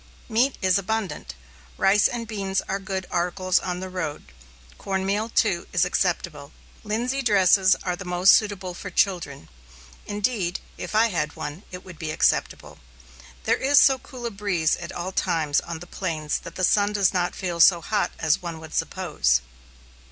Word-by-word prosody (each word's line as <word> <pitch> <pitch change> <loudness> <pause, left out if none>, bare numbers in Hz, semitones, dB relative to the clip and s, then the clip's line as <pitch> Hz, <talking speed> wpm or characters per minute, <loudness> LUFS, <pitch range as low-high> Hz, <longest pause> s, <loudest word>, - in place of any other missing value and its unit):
Meat 245 +4 +1
is 185 +1 +3
abundant. 195 - -4 0.4
Rice 200 +2 +4
and 235 -2 -5
beans 195 -3 -2
are 195 - -2
good 190 -1 -4
articles 180 +1 +1
on 180 0 -4
the 190 - -4
road; 160 - -5 0.5
cornmeal, 195 +3 -1
too, 190 -6 +1
is 180 0 +3
acceptable. 170 -5 -2 0.3
Linsey 240 +6 -1
dresses 195 -4 +4
are 180 -1 -1
the 185 - -8
most 180 +1 +5
suitable 195 -4 +1
for - - -7
children. 170 - -1 0.6
Indeed, 205 -4 -1 0.2
if - - -6
I 225 +2 +4
had 150 -6 -2
one, 150 +4 -6
it 180 0 -9
would 180 -4 -12
be 160 - -4
acceptable. 155 - 0 0.6
There - - +2
is 280 +1 +4
so 265 -1 +5
cool 250 -3 -10
a 235 - -2
breeze 195 -6 0
at 170 +1 -8
all 175 +2 -5
times 155 -5 +1
on 170 - -6
the 170 - -10
plains 160 -5 -3
that 170 -1 -11
the 185 - -3
sun 205 +2 +3
does 200 -2 +2
not 180 -1 0
feel 175 -3 -4
so 170 +1 +7
hot 210 +6 -1
as 160 -1 +1
one 170 -2 -6
would 160 -1 -11
suppose. 155 - 0
185 Hz, 170 wpm, -24 LUFS, 170-205 Hz, 0.6 s, so